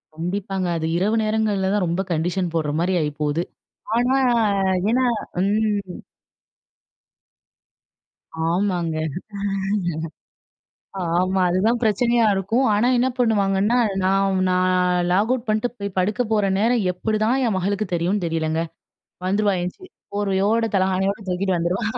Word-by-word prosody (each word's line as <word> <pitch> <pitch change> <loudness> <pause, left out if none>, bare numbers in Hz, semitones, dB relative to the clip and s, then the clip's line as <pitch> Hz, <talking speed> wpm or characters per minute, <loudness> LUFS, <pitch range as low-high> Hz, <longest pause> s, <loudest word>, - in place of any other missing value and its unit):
கண்டிப்பாங்க. 185 +2 -3
அது 160 - -3
இரவு 210 +5 +1
நேரங்கள்ல 215 -3 0
தான் 205 -3 +1
ரொம்ப 170 +3 -1
கண்டிஷன் 175 +2 -1
போடுற 155 -3 0
மாரி 185 +2 +1
ஆயிப்போவுது. 150 +2 -1 0.5
ஆனா, 250 +2 +2 0.7
ஏன்னா 255 +3 +2 0.4
ம். 205 -2 -1 2.5
ஆமாங்க. 175 -2 0 2.1
ஆமா. 180 +3 +1
அதுதான் 215 +7 +1
பிரச்சனையா 235 +2 +2
இருக்கும். 220 +7 +1
ஆனா 215 +4 +2
என்ன 250 +2 +2
பண்ணுவாங்கன்னா, 210 -1 +2 0.3
நான் 195 0 +2
நான் 185 0 +2 0.4
லாக் 205 +6 +2
அவுட் 250 -2 -4
பண்ணிட்டு 215 +3 +1
போய் 200 -2 -5
படுக்கப்போற 210 +2 +1
நேரம் 230 0 +2
எப்படிதான் 215 +5 0
என் 215 -4 0
மகளுக்கு 200 +3 -1
தெரியும்னு 175 +3 0
தெரியலங்க! 160 -1 -1 0.6
வந்துருவா. 200 +2 +2
எந்திச்சி 360 - -7 0.2
போர்வையோட, 205 +3 +1
தலகாணியோட 190 +2 +1
தூக்கிட்டு 185 +1 0
வந்துருவா. 175 +6 -1
195 Hz, 110 wpm, -22 LUFS, 180-215 Hz, 2.5 s, ஆனா